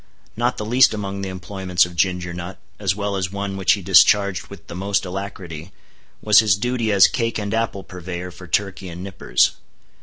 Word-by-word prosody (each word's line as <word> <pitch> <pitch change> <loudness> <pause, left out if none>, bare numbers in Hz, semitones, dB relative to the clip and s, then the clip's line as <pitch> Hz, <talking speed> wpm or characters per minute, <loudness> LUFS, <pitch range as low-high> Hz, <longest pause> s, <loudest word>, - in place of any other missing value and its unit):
Not 120 +3 0
the 105 - -4
least 120 +1 +4
among 100 -1 -4
the 100 - -4
employments 95 -1 0
of 90 -1 -10
Ginger 90 0 0
Nut, 90 +2 -7 0.2
as 95 -3 0
well 100 -1 -2
as 95 -1 -2
one 100 -1 -4
which 95 -1 +3
he 100 - -4
discharged 95 +1 +4
with - - -12
the - - -9
most 100 +3 -1
alacrity, 90 -3 -7 0.5
was 105 -1 +7
his 105 -4 +3
duty 120 0 -1
as 100 -2 +7
cake 115 -2 -1
and 105 0 -3
apple 110 -4 -1
purveyor 90 0 -7
for 90 +1 -12
Turkey 95 0 -2
and 85 +2 -8
Nippers. 95 -11 +1
95 Hz, 190 wpm, -21 LUFS, 90-105 Hz, 0.5 s, was